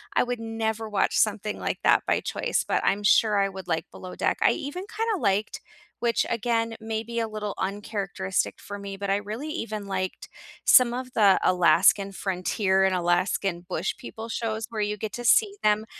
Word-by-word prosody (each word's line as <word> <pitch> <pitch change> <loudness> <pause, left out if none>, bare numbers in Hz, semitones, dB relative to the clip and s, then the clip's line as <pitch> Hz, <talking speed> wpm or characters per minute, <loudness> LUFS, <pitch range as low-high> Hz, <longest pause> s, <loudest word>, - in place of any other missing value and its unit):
I - - +4
would 245 -1 -3
never 225 -1 -3
watch 200 -2 +1
something 210 0 0
like - - -2
that - - +4
by - - +2
choice, - - -1
but - - 0
I'm 205 - +2
sure 210 0 +4
I 195 0 +2
would 190 -1 -9
like 165 -1 -1
Below 185 - -9
Deck. - - 0
I - - +6
even 355 +8 -5
kinda 445 -4 0
liked, 205 0 0 0.4
which 235 -1 +1
again, 230 0 0
maybe 225 +1 -3
a 225 - -1
little 210 -1 -4
uncharacteristic 195 -1 -2
for 205 0 -7
me, 200 -1 -7
but 200 0 -4
I 195 - +3
really 215 +8 -5
even 215 - -4
liked 185 -1 -3 0.4
some 245 -2 +6
of 255 0 -5
the 200 -4 +5
Alaskan 185 +3 +4
Frontier 190 +1 0
and 190 -1 +3
Alaskan 175 0 0
Bush 180 +1 -2
People 225 +1 -8
shows 225 -1 -3
where 220 -2 -3
you 210 0 -1
get 215 +1 -5
to 240 - -5
see 405 - +4
them 210 +1 +2
210 Hz, 190 wpm, -26 LUFS, 195-230 Hz, 0.4 s, I